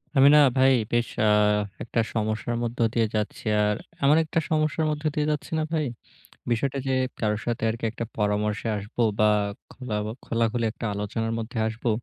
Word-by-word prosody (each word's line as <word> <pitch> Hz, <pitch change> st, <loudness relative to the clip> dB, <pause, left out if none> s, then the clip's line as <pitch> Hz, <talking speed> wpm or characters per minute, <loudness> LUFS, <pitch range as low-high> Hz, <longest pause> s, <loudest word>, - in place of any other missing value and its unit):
আমি 135 Hz, +1 st, +7 dB
না -, -, +8 dB, 0.2 s
ভাই 130 Hz, 0 st, +6 dB, 0.2 s
বেশ 120 Hz, 0 st, +2 dB, 0.2 s
আ -, -, +5 dB, 0.5 s
একটা 115 Hz, 0 st, -2 dB
সমস্যার 110 Hz, +1 st, -1 dB
মধ্য 120 Hz, +2 st, -4 dB
দিয়ে 115 Hz, -2 st, +2 dB
যাচ্ছি। 105 Hz, -1 st, -3 dB, 0.2 s
আর 105 Hz, 0 st, +2 dB, 0.3 s
আমার 145 Hz, +3 st, +5 dB
একটা 160 Hz, +1 st, -1 dB
সমস্যার 155 Hz, 0 st, +1 dB
মধ্যে 150 Hz, +1 st, -2 dB
দিয়ে 150 Hz, 0 st, +1 dB
যাচ্ছি 150 Hz, -, -4 dB
না -, -, +1 dB
ভাই। 155 Hz, -2 st, +1 dB, 0.7 s
বিষয়টা 135 Hz, +4 st, 0 dB
যে -, -, +1 dB, 0.3 s
কারো 105 Hz, -1 st, 0 dB
সাথে 120 Hz, -1 st, -2 dB
আরকি 115 Hz, +1 st, -5 dB
একটা 115 Hz, +1 st, -5 dB
পরামর্শে 105 Hz, +1 st, 0 dB
আসবো 105 Hz, +4 st, -5 dB, 0.2 s
বা, 110 Hz, -, +5 dB, 0.5 s
খোলা 125 Hz, -5 st, -5 dB
বা 110 Hz, -, -3 dB
খোলাখুলি 115 Hz, 0 st, 0 dB
একটা 115 Hz, -, -7 dB
আলোচনার 115 Hz, +3 st, -2 dB
মধ্যে 115 Hz, +1 st, -6 dB
আসবো, 110 Hz, +2 st, -3 dB
115 Hz, 175 wpm, -25 LUFS, 110-135 Hz, 0.7 s, না